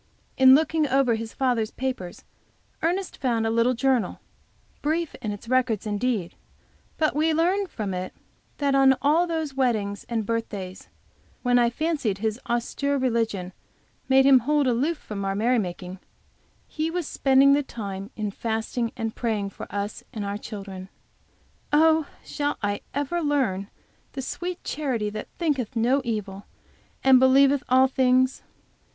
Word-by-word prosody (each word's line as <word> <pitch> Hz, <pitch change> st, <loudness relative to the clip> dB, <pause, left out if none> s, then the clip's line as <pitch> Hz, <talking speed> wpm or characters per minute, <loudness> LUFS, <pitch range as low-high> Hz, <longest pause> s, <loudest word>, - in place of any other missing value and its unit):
In 260 Hz, 0 st, +8 dB
looking 315 Hz, 0 st, +2 dB
over 265 Hz, -2 st, +3 dB
his 225 Hz, 0 st, -4 dB
father's 245 Hz, -5 st, 0 dB
papers, 250 Hz, -10 st, -5 dB, 0.6 s
Ernest 360 Hz, +3 st, -1 dB
found 235 Hz, -4 st, 0 dB
a 225 Hz, -, +1 dB
little 230 Hz, +2 st, +2 dB
journal, 250 Hz, -5 st, +1 dB, 0.6 s
brief 320 Hz, +2 st, -1 dB
in 215 Hz, -, -3 dB
its 205 Hz, +2 st, -8 dB
records 250 Hz, -4 st, +1 dB
indeed, 210 Hz, -3 st, -1 dB, 0.6 s
but 310 Hz, -2 st, +1 dB
we 315 Hz, +1 st, +2 dB
learn 370 Hz, +5 st, +1 dB
from 210 Hz, -, -4 dB
it 185 Hz, 0 st, -4 dB, 0.5 s
that 280 Hz, -1 st, +1 dB
on 270 Hz, -1 st, +5 dB
all 320 Hz, +5 st, +3 dB
those 320 Hz, -4 st, -2 dB
wedding 225 Hz, -7 st, 0 dB
and 225 Hz, -3 st, -1 dB
birthdays, 200 Hz, -5 st, -4 dB, 0.6 s
when 245 Hz, -1 st, +4 dB
I 240 Hz, -1 st, +4 dB
fancied 285 Hz, -, -1 dB
his 220 Hz, +2 st, -2 dB
austere 280 Hz, +4 st, 0 dB
religion 225 Hz, -8 st, -1 dB, 0.6 s
made 265 Hz, 0 st, +5 dB
him 270 Hz, -2 st, +7 dB
hold 290 Hz, +4 st, +1 dB
aloof 265 Hz, +7 st, +1 dB
from 205 Hz, -7 st, -6 dB
our 195 Hz, 0 st, -1 dB
merry 235 Hz, +4 st, +2 dB
making, 180 Hz, -1 st, -5 dB, 0.7 s
he 315 Hz, +1 st, -2 dB
was 345 Hz, -2 st, -3 dB
spending 275 Hz, +1 st, +4 dB
the 290 Hz, -, +3 dB
time 200 Hz, -7 st, -6 dB
in 210 Hz, -2 st, -3 dB
fasting 225 Hz, +2 st, -2 dB
and 225 Hz, -2 st, -3 dB
praying 210 Hz, -4 st, -2 dB
for -, -, -9 dB
us 205 Hz, +1 st, -4 dB
and 220 Hz, -5 st, -5 dB
for 200 Hz, -, -3 dB
our 200 Hz, -, -3 dB
children! 195 Hz, -3 st, -8 dB, 0.8 s
Oh, 315 Hz, 0 st, +4 dB, 0.2 s
shall 290 Hz, 0 st, -2 dB
I 205 Hz, 0 st, -1 dB
ever 290 Hz, +5 st, -1 dB
learn 250 Hz, -, 0 dB, 0.4 s
the 270 Hz, -, -5 dB
sweet 355 Hz, +6 st, -5 dB
charity 245 Hz, -9 st, -2 dB
that 215 Hz, -, -6 dB
thinketh 280 Hz, -, -1 dB
no 245 Hz, +5 st, +2 dB
evil, 205 Hz, -4 st, -4 dB, 0.6 s
and 265 Hz, -1 st, +7 dB
believeth 275 Hz, +2 st, +5 dB
all 260 Hz, +1 st, +6 dB
things? 260 Hz, 0 st, +2 dB
250 Hz, 150 wpm, -25 LUFS, 215-280 Hz, 0.8 s, In